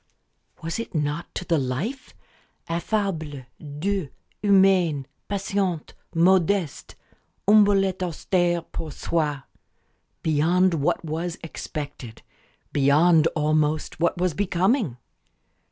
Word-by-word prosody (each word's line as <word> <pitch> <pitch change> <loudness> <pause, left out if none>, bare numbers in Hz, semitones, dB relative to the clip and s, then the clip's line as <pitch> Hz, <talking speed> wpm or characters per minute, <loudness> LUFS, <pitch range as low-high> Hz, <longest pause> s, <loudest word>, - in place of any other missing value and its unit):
Was 165 +5 -3
it 230 - -6
not 150 +2 -2
to 180 - -4
the 165 -3 +2
life? 150 - -4 0.5
"Affable, 165 - -2
doux, 155 +3 -3 0.3
humain 190 -8 +4 0.2
patient, 195 -4 -2 0.2
modeste 180 -1 +2 0.5
humble 205 -2 +6
et 190 -1 -3
austère 175 -1 0
pour 160 -2 -5
soi" 150 -3 -1 0.8
beyond 170 +4 +3
what 165 +2 0
was 165 +2 -3
expected, 145 -7 -7 0.5
beyond, 155 +4 +5
almost, 155 0 0
what 170 +1 +1
was 180 -1 +1
becoming? 190 - +1
170 Hz, 95 wpm, -24 LUFS, 150-190 Hz, 0.8 s, humble